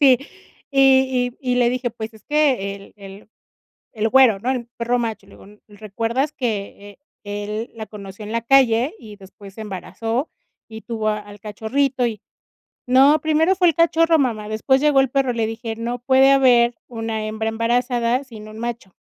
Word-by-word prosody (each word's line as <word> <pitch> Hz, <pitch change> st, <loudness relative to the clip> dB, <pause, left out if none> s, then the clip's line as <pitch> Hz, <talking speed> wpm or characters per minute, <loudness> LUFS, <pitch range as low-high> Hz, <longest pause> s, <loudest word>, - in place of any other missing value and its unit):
Sí, 265 Hz, -4 st, +6 dB, 0.5 s
y 265 Hz, -2 st, +3 dB
y 250 Hz, -1 st, -1 dB
y -, -, +2 dB
le 240 Hz, -1 st, +3 dB
dije: 250 Hz, -1 st, -2 dB
"Pues 225 Hz, -1 st, -7 dB
es 220 Hz, -, -18 dB
que 270 Hz, -10 st, +1 dB
el 200 Hz, 0 st, -14 dB
el 195 Hz, +1 st, -13 dB, 0.6 s
el 220 Hz, 0 st, -1 dB
güero, 255 Hz, -4 st, +5 dB
¿no?, 240 Hz, +6 st, -2 dB
el 245 Hz, -3 st, -2 dB
perro 240 Hz, +1 st, 0 dB
macho", 225 Hz, -4 st, -4 dB
le 200 Hz, -, -19 dB
digo: -, -, -16 dB, 0.2 s
"¿Recuerdas 225 Hz, +7 st, -3 dB
que 205 Hz, -3 st, -5 dB, 0.3 s
e 205 Hz, 0 st, -5 dB
él 215 Hz, +3 st, -5 dB
la 220 Hz, -1 st, -7 dB
conoció 200 Hz, 0 st, -10 dB
en 210 Hz, -, -7 dB
la 230 Hz, -1 st, -1 dB
calle 255 Hz, -, +3 dB
y 210 Hz, -2 st, -12 dB
después 195 Hz, 0 st, -14 dB
se 220 Hz, -, -10 dB
embarazó 225 Hz, -, -4 dB, 0.4 s
y 220 Hz, 0 st, -10 dB
tuvo 220 Hz, -2 st, -3 dB
al 205 Hz, -1 st, -7 dB
cachorrito?". 245 Hz, +5 st, -1 dB
Y, 220 Hz, -3 st, -4 dB, 0.7 s
"No, 275 Hz, +4 st, +5 dB
primero 320 Hz, +4 st, +2 dB
fue 360 Hz, -1 st, +3 dB
el 325 Hz, -, -1 dB
cachorro, 330 Hz, 0 st, +3 dB
mamá, 220 Hz, -6 st, -1 dB
después 265 Hz, +5 st, +1 dB
llegó 295 Hz, -2 st, +4 dB
el 265 Hz, -, 0 dB
perro", 265 Hz, -1 st, 0 dB
le 230 Hz, -1 st, -1 dB
dije: 225 Hz, 0 st, -5 dB
"No 235 Hz, +2 st, -4 dB
puede 265 Hz, +2 st, +4 dB
haber 245 Hz, -3 st, +4 dB
una 225 Hz, -2 st, -4 dB
hembra 220 Hz, +1 st, -3 dB
embarazada 240 Hz, +2 st, 0 dB
sin 220 Hz, -5 st, -12 dB
un 215 Hz, +1 st, -11 dB
macho". 235 Hz, -5 st, -6 dB
235 Hz, 180 wpm, -21 LUFS, 215-265 Hz, 0.7 s, Sí